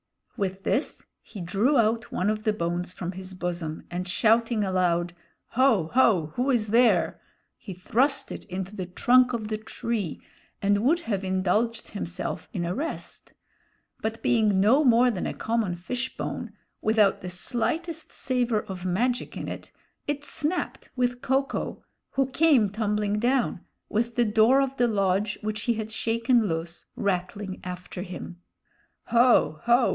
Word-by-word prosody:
With 195 -3 -3
this 275 - -1 0.2
he 210 - -11
drew 205 - +2
out 225 0 +1
one 185 - 0
of 215 0 -3
the 215 -1 +2
bones 175 -2 -2
from 180 -1 -5
his 190 0 -8
bosom, 170 -3 -4
and 180 +1 -3
shouting 225 +3 +2
aloud, 175 -2 +1 0.4
"Ho! 225 -10 +3
ho! 200 -11 +4
who 250 +3 0
is 230 -5 +1
there?" 235 +3 +3 0.3
he 190 - -9
thrust 250 +9 +1
it - - -6
into 190 +1 -5
the 185 -4 -4
trunk 250 +7 +4
of 220 -3 -3
the 215 -1 -2
tree 220 -5 -3 0.4
and 205 0 +2
would 330 +7 +3
have 200 - -2
indulged 195 +5 0
himself 180 -3 -4
in 175 -3 -2
a 175 - -1
rest; 310 - -5 0.7
but 220 +1 -3
being 215 -4 +3
no 235 +10 +5
more 245 -1 +5
than 190 - -3
a - - -4
common 225 -5 -1
fish 250 +9 -4
bone, - - -4 0.3
without 215 -2 +3
the 180 - -5
slightest 315 - -3
savor 245 -4 0
of 185 -2 -7
magic 240 +7 -1
in - - -5
it, - - -7 0.4
it 290 0 -2
snapped 320 +6 -2
with 245 -1 0
Ko 270 0 +2
ko, 270 - -5 0.3
who 270 - +2
came 270 -9 +4
tumbling 210 -1 0
down, 245 -5 +1 0.2
with 230 +2 -1
the 240 - +3
door 225 +5 +5
of 270 -1 -1
the 245 - +3
lodge, 200 -1 +1
which 215 0 -2
he 235 - +1
had 220 0 -4
shaken 230 +1 +2
loose, 165 0 -4
rattling 190 0 -2
after 180 0 -6
him. 180 -1 -8 0.7
"Ho! 235 -9 +4
ho! 240 +1 +4
215 Hz, 160 wpm, -26 LUFS, 185-245 Hz, 0.7 s, no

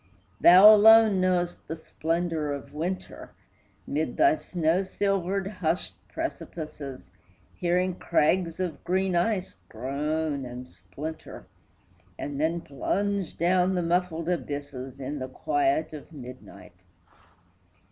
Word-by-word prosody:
Thou 190 +5 +9
alone 215 -2 +7
know'st 175 -1 0
the 160 - -4
splendor 165 -1 -2
of 140 0 -6
winter, 175 +5 -5 0.5
Mid 155 +3 -2
thy 340 +1 +5
snow 175 - 0
silvered, 195 0 -1
hushed 185 -3 -2
precipices, 145 - -6 0.4
Hearing 180 +1 0
crags 165 +2 +1
of 175 -6 -3
green 185 0 0
ice 185 - 0
groan 145 +4 -2
and 125 0 -8
splinter, 155 +5 -9 0.7
And 145 0 -4
then 165 +2 0
plunge 200 +6 -2
down 180 +2 +2
the 180 - 0
muffled 170 -1 0
abysses 140 -6 -4
In 140 +2 -4
the 130 0 -5
quiet 340 - 0
of 150 +1 -10
midnight. 125 - -12
170 Hz, 110 wpm, -27 LUFS, 145-185 Hz, 0.7 s, Thou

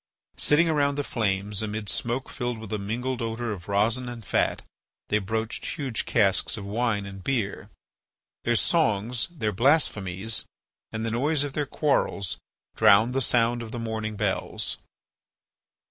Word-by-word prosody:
Sitting 160 +3 +4
around 145 -3 +2
the 145 - -1
flames, 100 -4 -1
amid 110 -1 -3
smoke 120 +5 -1
filled 120 -3 -3
with 110 -1 -7
a 105 - 0
mingled 120 +5 -2
odour 115 0 -2
of 90 -4 -6
resin 110 +5 +2
and 120 -3 -8
fat, - - +1 0.5
they 105 - +3
broached 110 +3 -2
huge 135 -6 -2
casks 105 -1 +2
of 100 - -6
wine 105 -1 0
and 95 -1 -8
beer. 115 -7 -1 0.7
Their 120 - +2
songs, 115 - +1
their 125 -12 -2
blasphemies, 110 - +1 0.5
and 110 +1 -3
the 115 - -1
noise 145 +5 +2
of 145 -2 -4
their 145 -1 -1
quarrels 135 - 0 0.4
drowned 110 +5 +6
the 135 - +1
sound 120 0 +2
of 115 -1 -7
the 120 - -4
morning 110 -2 -3
bells. - - -1
115 Hz, 150 wpm, -26 LUFS, 105-125 Hz, 0.7 s, drowned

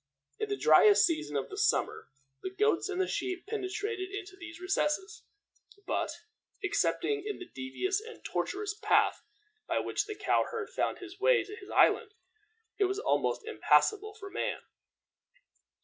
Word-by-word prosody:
In 430 -1 -2
the 405 - -1
driest 415 0 +7
season 150 - -1
of 140 - -3
the 395 - -6
summer 445 - +1 0.3
the - - -3
goats 400 0 +1
and 375 -1 -2
the 375 - +2
sheep 365 0 -3
penetrated 405 -1 -3
into 395 -1 -7
these 350 -2 -10
recesses, 385 +3 -1 0.6
but, - - -1 0.5
excepting 425 -2 0
in 420 0 -4
the 365 - -8
devious 340 - -2
and 450 0 -12
tortuous 410 +1 -2
path 415 - +2 0.5
by - - 0
which - - -1
the 425 - -5
cow 405 0 +2
herd 455 -1 -5
found - - -1
his 370 +1 -11
way - - +4
to 415 - -9
his 395 -2 -12
island, 430 -2 +3 0.6
it 400 - +5
was 385 +1 -1
almost 430 0 0
impassable 425 -1 +2
for 395 -2 -9
man. - - -2
400 Hz, 155 wpm, -31 LUFS, 375-425 Hz, 0.6 s, driest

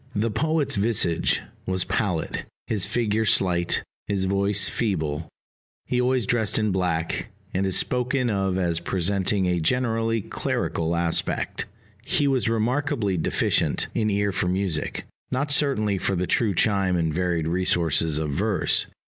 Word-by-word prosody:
The 110 +2 0
poet's 155 +2 +1
visage 100 -6 +1 0.3
was 95 -1 0
pallid, - - -2 0.2
his 100 -3 0
figure 110 -1 0
slight, 90 -4 +2 0.2
his 100 -2 0
voice 100 +1 +2
feeble; 80 -7 -2 0.6
he 125 0 0
always 125 -2 +1
dressed 110 -1 +1
in 110 -2 +1
black, 90 -3 -1 0.3
and 95 +1 0
is 95 - +1
spoken 125 +1 0
of 95 -4 0
as 85 -3 0
presenting 95 +1 0
a 90 -1 +1
generally 115 +4 +1
clerical 85 -4 -2
aspect. 85 -1 -1 0.4
He 145 +2 +1
was 130 -4 +1
remarkably 115 -1 0
deficient 80 - 0
in 110 -2 +1
ear 100 0 +1
for 90 - -1
music 90 -3 -2 0.2
not 140 +3 -1
certainly 110 -9 +2
for 95 - 0
the 90 +1 0
true 105 0 +1
chime 95 -2 +2
and 80 -3 0
varied 85 -2 0
resources 85 -3 +2
of 75 -2 -2
verse. 100 +6 +1
100 Hz, 140 wpm, -24 LUFS, 90-115 Hz, 0.6 s, slight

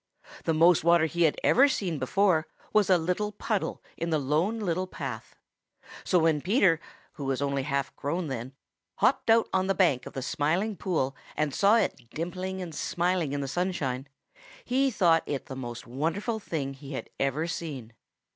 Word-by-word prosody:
The 165 - +2
most 170 +1 +5
water 170 -1 +5
he 170 +1 +2
had 155 - +2
ever 275 +3 +6
seen 180 - -2
before 170 +3 +2 0.3
was 215 -2 +4
a 185 - +6
little 180 +5 -1
puddle 210 0 -2
in 170 - -2
the 160 - +2
Lone 155 +10 0
Little 185 -2 -1
Path. - - -6 0.7
So 185 - +2
when 160 -3 +3
Peter, 185 - +3 0.4
who 145 - -5
was 135 -1 0
only 140 -1 0
half 140 0 -2
grown 165 +5 -2
then, 130 -2 -5 0.4
hopped - - +2
out 225 0 +5
on 190 0 +2
the 195 - +1
bank 140 -10 +2
of - - -10
the 135 - -4
Smiling 175 - 0
Pool 155 -8 -1 0.2
and 150 -2 0
saw 205 +2 +4
it 125 - -1
dimpling 185 +4 -4
and 170 -3 -7
smiling 175 -2 0
in 145 0 -2
the 135 - -3
sunshine, 140 -5 -2 0.6
he 270 +2 +2
thought 175 -8 +3
it 140 -2 -3
the 135 - -7
most 120 -2 -6
wonderful 165 - -2
thing 145 -9 -3
he 135 0 -6 0.2
ever 135 +2 0
had 170 +1 -1
seen. 135 -11 -6
165 Hz, 180 wpm, -28 LUFS, 140-185 Hz, 0.7 s, ever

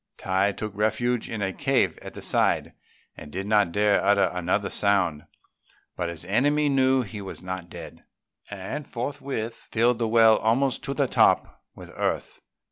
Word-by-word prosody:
Tai 95 +2 +1
took 105 -1 -6
refuge 120 +3 0
in 110 -3 -3
a 95 0 -2
cave - - +1
at - - -10
the - - -8
side, - - +1 0.4
and 75 - -11
did 95 +4 -4
not 105 -4 +2
dare 105 +1 +2
utter 100 0 +3
another 90 +3 -1
sound; 95 -7 +1 0.7
but 85 -2 -2
his 85 0 -6
enemy 145 +9 +2
knew 130 -1 +3
he 105 -1 -8
was 95 -1 -8
not 90 -1 -6
dead, - - -10 0.5
and 100 +9 -6
forthwith 120 -2 -4
filled 120 +1 0
the 115 - 0
well 110 -1 +5
almost 125 +4 +1
up - - -11
to 140 - -2
the 140 -2 +1
top - - +2
with - - -12
earth. - - -3
105 Hz, 170 wpm, -25 LUFS, 95-120 Hz, 0.7 s, well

